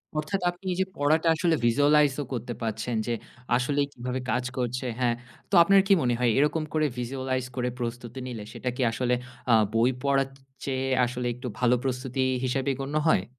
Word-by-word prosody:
অর্থাৎ 155 +6 -1
আপনি 175 +2 -9
এই 180 - -2
যে - - +2
পড়াটা 155 +3 +2
আসলে 165 0 +2
Visualize 145 +3 +4
ও - - -2
করতে 120 0 -3
পারছেন 110 +1 -2
যে 120 - 0 0.4
আসলেই 140 +3 +1
কিভাবে 125 +1 -4
কাজ 125 0 +1
করছে। 125 +1 -2
হ্যাঁ, 120 -2 +2 0.3
তো - - -15
আপনার 195 +2 +6
কি 200 - +6
মনে 120 - +2
হয় 125 -1 +3
এরকম 150 +2 +2
করে 155 -1 +2
Visualize 130 +1 -2
করে 125 -1 0
প্রস্তুতি 120 +1 -5
নিলে 115 -4 -6
সেটা 125 +1 -3
কি 130 - -3
আসলে 125 +2 0 0.4
আ - - +7 0.2
বই 115 +2 +4
পড়ার 135 -1 +2
চ - - -18 0.3
চেয়ে 135 -1 -1 0.2
আসলে 125 0 -3
একটু 125 +2 -7
ভালো 125 0 +4
প্রস্তুতি 130 0 -2 0.2
হিসেবে 135 +2 0
গণ্য 140 +2 -4
হয়? 95 -10 +3
130 Hz, 190 wpm, -27 LUFS, 120-145 Hz, 0.4 s, আ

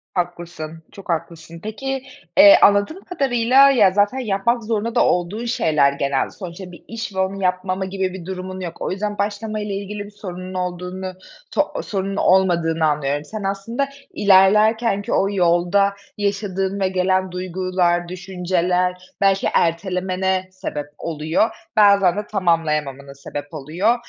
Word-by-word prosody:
Haklısın, 170 -3 -4
çok 195 -1 -13
haklısın. 165 0 -4
Peki, 265 +5 -4 0.3
eee, 300 +1 +9
anladığım 205 - +3
kadarıyla, 270 -4 +4
ya, 210 -8 +5
zaten 205 +6 +1
yapmak 235 +1 0
zorunda 225 +1 -2
da - - +4
olduğun 180 +7 0
şeyler 150 - +2
genelde. 140 -1 -1
Sonuçta 180 -1 -9
bir 175 - -14
iş 225 -3 -6
ve - - -2
onu 190 +1 -1
yapmama 185 +1 0
gibi 190 -1 -2
bir 185 -3 -8
durumun 185 0 -6
yok. 175 -3 -6
O - - -2
yüzden 205 +2 -3
başlama 215 +1 -2
ile 210 -1 -4
ilgili 205 +1 -5
bir 205 - -12
sorunun 185 -2 -8
olduğunu 180 +1 -4 0.4
so - - 0
sorunun 195 -1 -3
olmadığını 170 -5 +2
anlıyorum. 145 -1 0
Sen, 215 +5 -6
aslında, 215 +8 -2 0.2
ilerlerken 205 +2 +4
ki - - -4
o 195 - +2
yolda 180 +2 +2 0.2
yaşadığın 200 -1 -1
ve 190 - +2
gelen 185 0 +1
duygular, 180 -1 0
düşünceler 180 0 -1
belki 195 -1 +3
ertelemene 185 +2 0
sebep 150 -5 -5
oluyor. 160 +6 0 0.3
Bazen 200 -3 +5
de 210 0 -3
tamamlayamamana 150 -7 -1
sebep 145 +2 -8
oluyor. 165 - 0
190 Hz, 140 wpm, -21 LUFS, 175-205 Hz, 0.4 s, eee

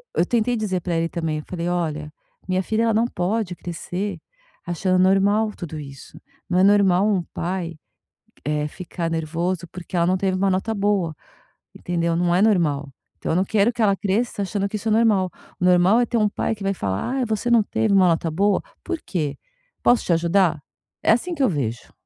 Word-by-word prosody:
eu 170 - +3
tentei 240 +3 +1
dizer 200 -5 -1
pra 175 0 -2
ele 165 0 +1
também, 160 -3 -2
eu - - -8
falei: 170 -1 -4
"Olha, 155 -4 -2 0.4
minha 185 0 0
filha 220 +4 0
ela 230 -1 +2
não 225 +2 +3
pode 185 -1 -2
crescer 180 +4 -5 0.5
achando 185 +1 0
normal 200 +3 +3
tudo 160 -3 -6
isso." 140 -2 -11 0.3
Não 180 0 +2
é - - +5
normal 200 -1 +4
um 195 -4 +1
pai, 175 -2 -3 0.7
eh, 150 0 0
ficar 170 +1 -5
nervoso 170 +2 -2
porque 180 0 -8
ela 170 - +3
não 185 +2 +2
teve 185 0 0
uma 195 +1 +2
nota 190 +4 -1
boa, 200 -6 0 0.6
entendeu. 170 -1 -1
Não 175 0 +2
é 185 - +3
normal. 160 -10 +2 0.3
Então - - -3
eu - - +1
não 185 - +2
quero 215 +3 +2
que 235 - -4
ela 200 -2 +4
cresça 205 +2 -1
achando 200 0 -2
que 215 - -5
isso 220 +2 -3
é - - +1
normal. 210 -5 +3 0.3
O 180 - 0
normal 180 +5 +5
é - - +2
ter 235 - 0
um 210 -2 +3
pai 205 - -1
que 205 - -9
vai 195 0 +1
falar, 100 - -2 0.2
ai 260 - +1
você 220 +1 -1
não 230 -2 +5
teve 210 0 0
uma 190 -2 +5
nota 165 -1 +1
boa? 200 +6 +2 0.2
Por 345 -2 -3
quê? 150 -7 -2 0.5
Posso 240 -1 +4
te 175 - +2
ajudar? 170 -1 +2 0.4
É - - +4
assim 345 +10 -1
que 285 - -4
eu 255 - +4
vejo. 120 - -3
185 Hz, 205 wpm, -22 LUFS, 170-210 Hz, 0.7 s, é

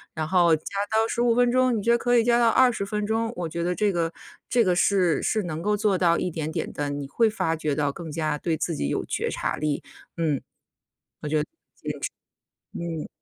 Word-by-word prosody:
然 155 -1 -2
后 170 -1 +4
加 155 - -9 0.3
到 220 +1 +3
15 235 0 +1
分 245 0 +4
钟， 255 -1 +3
你 - - -2
觉 235 - +3
得 235 - +5
可 245 0 +3
以 230 - +4
加 240 0 +3
到 235 -1 +5
20 245 -4 +3
分 210 +1 -2
钟， 225 +1 0
我 175 -2 -3
觉 170 +2 -4
得 180 +1 0
这 205 +3 +2
个 165 -1 0 0.4
这 240 -2 +4
个 180 -3 +2
是 180 -3 +2
是 215 -2 +1
能 165 -2 -4
够 210 +3 +1
做 205 -3 +2
到 170 -2 +4
一 180 - -2
点 160 -1 -3
点 - - -3
地， 145 -1 -2
你 145 -1 -4
会 225 +11 +2
发 165 -6 -1
觉 155 -2 -2
到 145 -1 0
更 165 +1 -8
加 155 -1 -1
对 165 0 -1
自 165 - -2
己 70 - -2
有 - - -1
觉 - - -2
察 - - -2
力， 150 -1 -1 0.3
嗯。 155 -5 0 0.8
我 - - -2
觉 155 - 0
得 150 - +2 1.1
坚 - - -10 0.2
持， - - -4
嗯。 - - -9
175 Hz, 240 characters per minute, -25 LUFS, 155-225 Hz, 1.1 s, 得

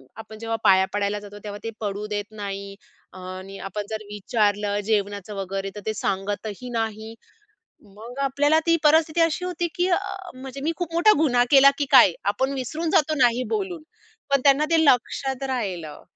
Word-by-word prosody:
आपण 220 0 -10
जेव्हा 225 0 -3
पाया 190 0 +6
पडायला 205 0 -1
जातो 205 0 -11
तेव्हा 205 0 -6
ते - - -2
पडू 205 0 -3
देत 205 +1 -5
नाही. 200 -1 -6 0.4
आणि 185 +1 -8
अ, - - -8
आपण 205 +1 -4
जर 215 -1 -4
विचारलं 205 -1 0
जेवणाचं 205 -1 -1
वगैरे 195 0 -4
तर 210 - -7
ते 215 - 0
सांगतही 205 +4 -3
नाही. 220 0 -4 0.8
मग 240 +5 -10
आपल्याला 290 +3 +2
ती 335 - +4
परिस्थिती 315 +2 +4
अशी 330 +2 +1
होती 355 -1 -2
की 360 -1 +1 0.5
म्हणजे 265 +1 -8
मी 315 - 0
खूप 350 -2 -4
मोठा 345 +6 +5
गुन्हा 250 -6 +3
केला 275 -1 +8
की 290 - +1
काय? 245 -9 +8 0.2
आपण 265 +6 -1
विसरून 305 +6 -3
जातो 310 0 +3
नाही 245 0 +3
बोलून. 380 -6 -3 0.5
पण 275 -1 +3
त्यांना 280 +1 +5
ते 330 - +4
लक्षात 265 0 +1
राहिलं. 185 - -4
225 Hz, 170 wpm, -24 LUFS, 205-280 Hz, 0.8 s, केला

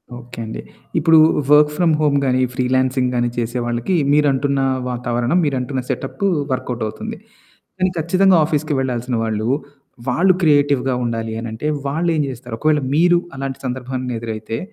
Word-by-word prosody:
Okay 120 -1 -10
అండి. 110 - -6 0.4
ఇప్పుడూ 165 -1 +5 0.3
work 150 0 +6
from 170 -3 +3
home 145 -2 +3
గానీ, 130 -1 +2
ఈ - - -4
ఫ్రీలాన్సింగ్ 130 0 +1
గానీ 120 0 +1
చేసే 120 +1 -2
వాళ్ళకి 120 +10 -1 0.2
మీరంటున్నా 140 -2 +2 0.2
వాతావరణం, 120 +4 -1
మీరంటున్న 130 -1 -2
సెటప్పూ 170 +8 -2 0.2
వర్కౌటవుతుంది, 120 -4 -4 0.6
కానీ 185 0 +2
ఖచ్చితంగా 185 +4 +3
ఆఫీస్‌కి 155 0 -1
వెళ్లాల్సిన 125 -1 -2
వాళ్ళూ, 110 0 -2 0.6
వాళ్ళు 185 +9 +4
క్రియేటివ్‌గా 140 -4 +3
ఉండాలి 115 -1 -3
అనంటే, 115 +5 -4 0.2
వాళ్ళేం 160 +2 0
జేస్తారు. 125 -2 -6
ఒకవేళ 150 -1 +2
మీరు 175 +2 +4 0.2
అలాంటి 135 -1 -4
సందర్భాన్ని 125 -1 -4
ఎదురైతే 110 0 -5
130 Hz, 135 wpm, -19 LUFS, 120-150 Hz, 0.6 s, work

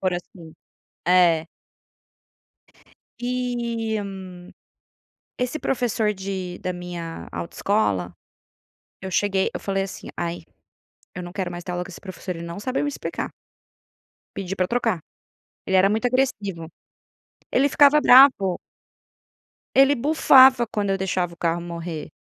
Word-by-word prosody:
por 185 -1 0
assim. 175 -2 -9 0.6
É. 175 -3 +4 1.7
E 240 -3 -2 1.4
esse 250 +5 -2
professor 230 -6 0
de 190 -2 -5
da 185 - -2
minha 175 -2 -7
autoescola, 105 - -1 0.9
eu 190 - -5
cheguei 195 0 +1
eu - - -4
falei 195 -1 -1
assim: 195 - -9
"Ai, 170 -1 -3 0.7
eu 180 - -6
não 175 0 -8
quero 185 -2 -3
mais 175 0 -7
ter 180 - -5
aula 180 0 -3
com 190 - -11
esse - - -11
professor, 185 -1 -7
ele 165 - -7
não 170 +3 -7
sabe 255 +4 -1
me 290 - 0
explicar". 290 - -4 1.1
Pedi 195 0 -4
pra 185 - +1
trocar. 230 -5 0 0.7
Ele 190 - +2
era 195 +2 +5
muito 220 +3 0
agressivo, 205 -10 -1 0.9
ele 275 +3 +3
ficava 290 +1 +5
bravo. 250 -10 +6 1.2
Ele 275 +1 +6
bufava 265 -2 +6
quando 205 -2 -2
eu 195 - 0
deixava 185 -2 -1
o - - -13
carro 170 0 -1
morrer. 170 -3 -6
195 Hz, 130 wpm, -23 LUFS, 175-240 Hz, 1.7 s, bravo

